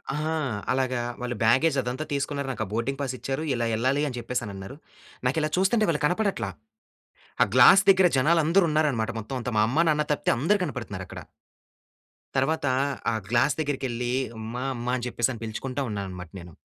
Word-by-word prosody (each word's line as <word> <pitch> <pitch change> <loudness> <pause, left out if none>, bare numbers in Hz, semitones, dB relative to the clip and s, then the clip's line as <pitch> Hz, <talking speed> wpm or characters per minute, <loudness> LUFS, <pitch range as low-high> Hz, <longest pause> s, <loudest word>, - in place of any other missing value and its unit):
ఆ! - - -2 0.5
అలాగా 130 -1 0 0.2
వాళ్ళు 125 0 -3
బ్యాగేజ్ 135 +6 +3
అదంతా 125 +5 -4
తీసుకున్నారు. 140 0 -2
నాకు 115 - -3
ఆ - - -12
బోర్డింగ్ 130 +5 -2
పాస్ 130 -2 -2
ఇచ్చారు. 135 +3 -3
ఇలా 120 -1 -1
ఎళ్ళాలి 130 +6 +1
అని 125 - -6
చెప్పేసి 120 +1 -3
అని 100 - -7
అన్నారు. 95 +7 -9 0.5
నాకు 135 +5 +1
ఇలా 155 - 0
చూస్తుంటే 210 +3 +3
వాళ్ళు 150 -3 0
కనపడట్ల. 195 - 0 1.0
ఆ - - +7
గ్లాస్ 195 - +8
దగ్గర 190 -1 +5
జనాలందరూ 165 +6 +4
ఉన్నారన్నమాట, 140 -7 +1
మొత్తం 115 +5 -6
అంతా. 120 0 -4
మా - - +5
అమ్మ 155 +7 +3
నాన్న 150 0 +2
తప్పితే - - 0
అందరు 205 +10 +2
కనపడుతున్నారు 105 - -6
అక్కడ. - - -8 1.1
తర్వాత 140 +3 +1 0.5
ఆ - - 0
గ్లాస్ 125 +5 +3
దగ్గరికెళ్లి, 130 -5 -2 0.3
అమ్మా 115 +3 -5
అమ్మా 120 +1 -3
అని 125 - -5
చెప్పేసి 120 +1 0
అని 115 - -10
పిలుచుకుంటా 130 +5 -4
ఉన్నాను 100 -2 -3
అన్నమాట 90 -2 -8
నేను. 85 -2 -12
130 Hz, 175 wpm, -26 LUFS, 120-150 Hz, 1.1 s, గ్లాస్